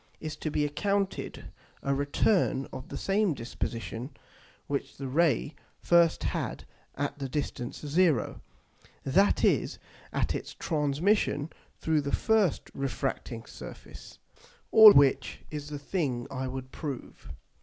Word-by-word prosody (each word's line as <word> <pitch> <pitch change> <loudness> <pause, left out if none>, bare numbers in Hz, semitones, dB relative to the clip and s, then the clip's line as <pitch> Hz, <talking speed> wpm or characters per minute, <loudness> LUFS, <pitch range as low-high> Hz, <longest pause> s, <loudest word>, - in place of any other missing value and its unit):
is 155 -1 -5
to 155 - -4
be 150 0 +1
accounted 195 +6 -2 0.3
a 140 - +1
return 140 +1 +1
of 130 +6 -8
the - - -5
same 195 -4 +1
disposition 115 0 -5 0.6
which 140 -1 -3
the 135 - -5
Ray 145 0 +2 0.3
first 170 -1 +4
had - - -2 0.3
at 145 +1 -3
the 135 -1 -4
distance 125 -3 -4
0, 150 - +1 0.6
that 190 +9 +3
is - - +2 0.3
at - - 0
its - - -6
transmission 150 +1 +1 0.3
through 160 -2 +1
the 140 0 -3
first 220 -7 +1
refracting 135 -3 -3
Surface. - - -11 0.5
All 220 -1 +11
which 140 -6 +3
is 150 -1 -5
the 150 - -4
thing 140 -5 -2
I 130 -1 -3
would 130 0 -6
prove. 145 -6 -7
145 Hz, 125 wpm, -29 LUFS, 135-170 Hz, 0.6 s, All